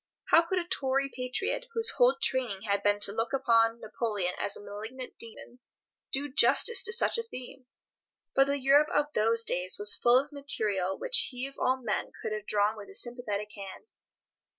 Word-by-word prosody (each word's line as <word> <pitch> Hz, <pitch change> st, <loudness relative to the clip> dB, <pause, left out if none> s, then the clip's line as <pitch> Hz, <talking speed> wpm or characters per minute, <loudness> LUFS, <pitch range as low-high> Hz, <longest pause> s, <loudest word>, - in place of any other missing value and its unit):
How 330 Hz, -, +7 dB
could 340 Hz, +3 st, -3 dB
a 345 Hz, -1 st, -2 dB
Tory 275 Hz, -4 st, -1 dB
patriot, 255 Hz, -, -3 dB
whose 455 Hz, 0 st, 0 dB
whole -, -, +4 dB
training 240 Hz, -7 st, -2 dB
had 200 Hz, -2 st, 0 dB
been 205 Hz, 0 st, +2 dB
to 200 Hz, -, 0 dB
look 225 Hz, +3 st, -3 dB
upon 230 Hz, -3 st, +2 dB
Napoleon 210 Hz, -4 st, -2 dB
as 200 Hz, -, -2 dB
a -, -, -12 dB
malignant 220 Hz, +6 st, -8 dB
Demon, 230 Hz, +2 st, -10 dB, 0.5 s
do 280 Hz, +2 st, +1 dB
justice 470 Hz, -, +4 dB
to -, -, -4 dB
such 465 Hz, +1 st, +3 dB
a 460 Hz, 0 st, -6 dB
theme? 255 Hz, -, -10 dB, 0.7 s
But 270 Hz, 0 st, +4 dB
the 280 Hz, 0 st, 0 dB
Europe 280 Hz, +3 st, +4 dB
of 295 Hz, +1 st, 0 dB
those 225 Hz, +2 st, +2 dB
days 180 Hz, -3 st, +1 dB
was 205 Hz, 0 st, +2 dB
full 240 Hz, +1 st, +4 dB
of 285 Hz, +3 st, -1 dB
material 210 Hz, -10 st, 0 dB
which -, -, +3 dB
he 250 Hz, 0 st, -5 dB
of 275 Hz, -, -10 dB
all 260 Hz, +1 st, +1 dB
men -, -, -2 dB
could -, -, -5 dB
have 215 Hz, -1 st, -5 dB
drawn 210 Hz, +1 st, +1 dB
with 205 Hz, -2 st, -10 dB
a -, -, -12 dB
sympathetic 210 Hz, -4 st, -2 dB
hand. 200 Hz, -, -10 dB
245 Hz, 190 wpm, -29 LUFS, 210-275 Hz, 0.7 s, How